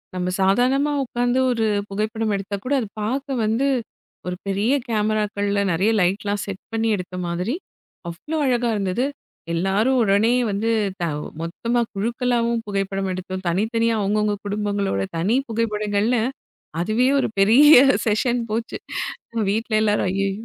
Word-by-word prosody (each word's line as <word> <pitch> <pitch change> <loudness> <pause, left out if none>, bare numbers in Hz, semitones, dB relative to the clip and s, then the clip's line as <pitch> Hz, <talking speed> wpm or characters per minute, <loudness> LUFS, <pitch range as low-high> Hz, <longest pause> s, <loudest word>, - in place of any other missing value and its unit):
நம்ம 180 0 -1
சாதாரணமா 255 +9 +3
உக்காந்து 245 +1 0
ஒரு 230 -2 0 0.2
புகைப்படம் 215 +2 -1
எடுத்தா 195 +1 -4
கூட 275 - 0
அது 225 - -3
பார்க்க 260 +3 -2
வந்து, 230 +6 +1 0.6
ஒரு 180 - -2
பெரிய 200 +7 +1 0.2
கேமராக்கள்ள 210 -2 0
நெறைய 190 +7 +2
லைட்லாம் 200 +3 0
செட் 195 -1 -7
பண்ணி 225 0 0
எடுத்த 180 0 -7
மாதிரி, 180 - -2 0.5
அவ்வளோ 255 - -5
அழகா 245 -2 +1
இருந்தது. 200 +4 0 0.5
எல்லாரும் 195 +9 +2
உடனே 205 +2 +3 0.2
வந்து 205 +3 -1 0.3
த - - 0 0.4
மொத்தமா 230 +9 -1
குழுக்களாவும் 235 +2 0
புகைப்படம் 195 -1 -2
எடுத்தோம். 185 +1 -5
தனித்தனியா 230 +5 +1
அவங்கவங்க 210 +1 +1
குடும்பங்களோட 200 - -1 0.2
தனி 195 +9 +1
புகைப்படங்கள்ல, 215 0 0 0.6
அதுவே 220 +7 +2
ஒரு - - 0
பெரிய 255 +10 +7 0.3
செஷன் 235 +3 +1
போச்சு. 225 +2 -2 0.7
வீட்டுல 220 +1 0
எல்லாரும் 210 -2 +2
ஐயையோ 195 0 0
215 Hz, 125 wpm, -22 LUFS, 195-235 Hz, 0.7 s, பெரிய